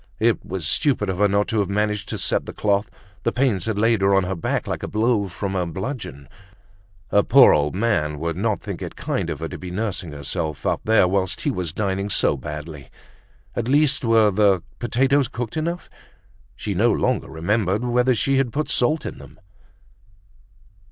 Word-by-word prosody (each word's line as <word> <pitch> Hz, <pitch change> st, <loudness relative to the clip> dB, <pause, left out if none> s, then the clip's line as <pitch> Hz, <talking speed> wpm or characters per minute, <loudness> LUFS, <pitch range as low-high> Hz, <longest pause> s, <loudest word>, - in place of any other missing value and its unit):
It -, -, +1 dB
was 90 Hz, -4 st, -4 dB
stupid 110 Hz, -, +2 dB
of 90 Hz, -, -5 dB
her 105 Hz, -, +5 dB
not 100 Hz, +1 st, +1 dB
to 110 Hz, -, 0 dB
have 100 Hz, -2 st, 0 dB
managed 105 Hz, +1 st, -1 dB
to 110 Hz, -, -3 dB
set 90 Hz, -, +1 dB
the -, -, -6 dB
cloth, 100 Hz, 0 st, 0 dB, 0.3 s
the 115 Hz, -, 0 dB
pains 120 Hz, -9 st, +1 dB
had 110 Hz, -2 st, -2 dB
laid 115 Hz, 0 st, +2 dB
her 100 Hz, 0 st, +4 dB
on 95 Hz, -, +3 dB
her 95 Hz, +1 st, -2 dB
back 85 Hz, -, -2 dB
like -, -, -4 dB
a -, -, -4 dB
blow 110 Hz, -1 st, +1 dB
from 95 Hz, +2 st, -4 dB
a 90 Hz, -, +1 dB
bludgeon. 90 Hz, -, -6 dB, 0.8 s
Her 105 Hz, -, +5 dB
poor 135 Hz, +6 st, +7 dB
old 75 Hz, +2 st, +1 dB
man 95 Hz, -9 st, 0 dB
would 85 Hz, +2 st, -3 dB
not 105 Hz, +1 st, 0 dB
think -, -, -6 dB
it -, -, -6 dB
kind -, -, -2 dB
of -, -, -5 dB
her -, -, -2 dB
to -, -, -8 dB
be 90 Hz, -, -7 dB
nursing 95 Hz, -3 st, -3 dB
herself 75 Hz, 0 st, -4 dB
up -, -, 0 dB
there 110 Hz, -4 st, +4 dB
whilst 95 Hz, 0 st, -1 dB
he 145 Hz, -, 0 dB
was 90 Hz, -, -3 dB
dining 100 Hz, +1 st, -2 dB
so -, -, +2 dB
badly. 75 Hz, -1 st, -8 dB, 0.7 s
At 120 Hz, -1 st, -2 dB
least 145 Hz, +1 st, +3 dB
were 115 Hz, -3 st, +4 dB
the 100 Hz, -3 st, +3 dB, 0.2 s
potatoes 135 Hz, +3 st, +2 dB
cooked 120 Hz, +2 st, -5 dB
enough? 170 Hz, +3 st, -3 dB, 0.7 s
She 105 Hz, -, -4 dB
no 110 Hz, +6 st, +3 dB
longer -, -, 0 dB
remembered 100 Hz, +6 st, 0 dB
whether 125 Hz, +1 st, +2 dB
she 135 Hz, +4 st, +1 dB
had 130 Hz, -3 st, 0 dB
put 150 Hz, +5 st, -2 dB
salt 150 Hz, +6 st, +1 dB
in -, -, -6 dB
them. -, -, -14 dB
105 Hz, 195 wpm, -22 LUFS, 90-120 Hz, 0.8 s, poor